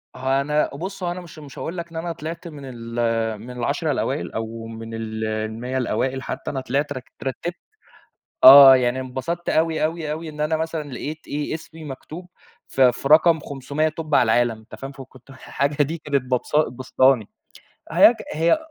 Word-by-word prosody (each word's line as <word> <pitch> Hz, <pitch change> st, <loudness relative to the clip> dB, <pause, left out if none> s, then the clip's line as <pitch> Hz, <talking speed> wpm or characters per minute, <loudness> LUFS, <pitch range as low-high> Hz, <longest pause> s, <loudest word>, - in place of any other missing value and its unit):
هو 130 Hz, +1 st, -2 dB
أنا 150 Hz, +2 st, +1 dB
بُصّ 190 Hz, +5 st, -6 dB
أنا 175 Hz, +1 st, -3 dB
مش 170 Hz, -3 st, -12 dB
مش 145 Hz, -2 st, -12 dB
هاقول 170 Hz, +3 st, -5 dB
لك 170 Hz, 0 st, -5 dB
إن -, -, -13 dB
أنا 170 Hz, +1 st, -3 dB
طلعت 165 Hz, +2 st, -7 dB
من 150 Hz, -4 st, -10 dB
ال 130 Hz, -2 st, -8 dB, 0.7 s
من 120 Hz, +3 st, -9 dB
ال10 125 Hz, -1 st, -1 dB
الأوائل، -, -, -2 dB
أو 115 Hz, 0 st, -5 dB
من 115 Hz, 0 st, -8 dB
ال 110 Hz, -1 st, -4 dB
ال100 110 Hz, +4 st, -3 dB
الأوائل 130 Hz, +2 st, -1 dB
حتى، -, -, -5 dB
أنا 135 Hz, -, -3 dB
طلعت 140 Hz, +3 st, -1 dB
اترتبت 135 Hz, +5 st, -5 dB, 0.9 s
آه، 135 Hz, 0 st, +11 dB
يعني 125 Hz, 0 st, +1 dB
انبسطت 130 Hz, +7 st, -4 dB
أوي، 160 Hz, -1 st, +1 dB
أوي، 160 Hz, -1 st, -2 dB
أوي، 160 Hz, +1 st, -5 dB
إن 150 Hz, 0 st, -7 dB
أنا 155 Hz, +1 st, +1 dB
مثلًا 160 Hz, -2 st, -3 dB
لقيت 155 Hz, +5 st, -6 dB
إيه، 145 Hz, +1 st, -3 dB
اسمي 160 Hz, 0 st, -8 dB
مكتوب 155 Hz, +5 st, -9 dB, 0.4 s
في 130 Hz, -2 st, +4 dB
في 135 Hz, -, -5 dB
رقم 160 Hz, +2 st, +6 dB
500 145 Hz, +2 st, -2 dB
توب 155 Hz, -1 st, -3 dB
على -, -, +6 dB
العالم، 115 Hz, -2 st, 0 dB
فاهم؟ 135 Hz, 0 st, -7 dB
فاكنت 135 Hz, -2 st, -14 dB
الحاجة 140 Hz, +2 st, -1 dB
دي 160 Hz, +4 st, -4 dB
كانت 145 Hz, -3 st, -1 dB
ببس 125 Hz, -1 st, -2 dB, 0.2 s
باسطاني، 130 Hz, -2 st, +2 dB, 0.6 s
هاك 185 Hz, +8 st, +7 dB, 0.2 s
هي 165 Hz, -, +3 dB
140 Hz, 175 wpm, -22 LUFS, 130-160 Hz, 0.9 s, آه